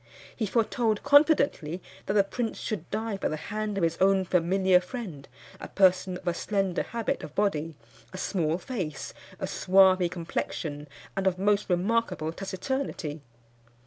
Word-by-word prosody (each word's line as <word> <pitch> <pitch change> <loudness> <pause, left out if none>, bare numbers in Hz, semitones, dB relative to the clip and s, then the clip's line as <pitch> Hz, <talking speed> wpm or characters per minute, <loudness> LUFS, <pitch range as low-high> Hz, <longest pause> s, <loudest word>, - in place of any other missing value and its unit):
He 220 - -1
foretold 225 0 +1
confidently 285 - +4 0.3
that 195 - 0
the 205 -1 +5
prince 225 +3 -3
should 195 -7 -4
die 220 -1 -2
by - - -1
the - - -2
hand 210 +5 -4
of 190 - 0
his 165 0 0
own 190 0 +4
familiar 185 +1 +3
friend, 180 - -7 0.3
a - - -7
person 185 -1 +3
of 180 - -14
a 175 - +2
slender 195 0 -1
habit 230 -2 -2
of 150 - -9
body, 165 -6 0 0.4
a - - -8
small 165 -4 0
face, 175 - -5 0.3
a - - -2
swarthy 185 -1 +4
complexion, 160 -3 -4 0.3
and 195 0 0
of 185 -1 +1
most 205 +2 +1
remarkable 180 -3 0
taciturnity. 190 - -4
190 Hz, 150 wpm, -28 LUFS, 170-215 Hz, 0.4 s, the